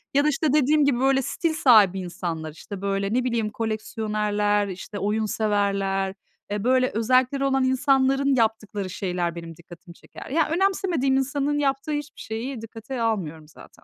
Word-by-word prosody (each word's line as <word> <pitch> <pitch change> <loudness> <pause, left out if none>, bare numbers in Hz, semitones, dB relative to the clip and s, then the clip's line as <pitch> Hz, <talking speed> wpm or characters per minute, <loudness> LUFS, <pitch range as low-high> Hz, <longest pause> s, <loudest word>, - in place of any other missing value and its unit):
Ya 285 - +5
da, - - +4
işte, 300 +2 0
dediğim 300 0 +4
gibi, 260 -4 +2
böyle, 270 0 +3
stil 325 +5 -1
sahibi 215 - +5
insanlar, 170 -3 -5
işte, 190 +5 -9
böyle, 195 +1 -1
ne 250 +1 +2
bileyim, 230 -4 -1
koleksiyonerler, 210 -2 -1
işte, 195 +2 -7
oyun 210 +3 0
severler. 200 -2 0 0.4
E, 205 -1 -2
böyle, 255 +1 +3
özellikleri 255 +4 +2
olan 270 -1 +2
insanların 270 +1 +2
yaptıkları 220 -4 -1
şeyler 175 -2 -2
benim 165 -1 -8
dikkatimi 170 +1 -14
çeker. - - -12
Ya, 305 +3 +1
önemsemediğim 345 -7 +1
insanın 285 +2 0
yaptığı 275 +1 -1
hiçbir 295 0 -5
şeyi 230 +3 -5
dikkate 225 +3 -7
almıyorum 165 -9 -2
zaten. 155 - -17
225 Hz, 155 wpm, -24 LUFS, 200-270 Hz, 0.4 s, Ya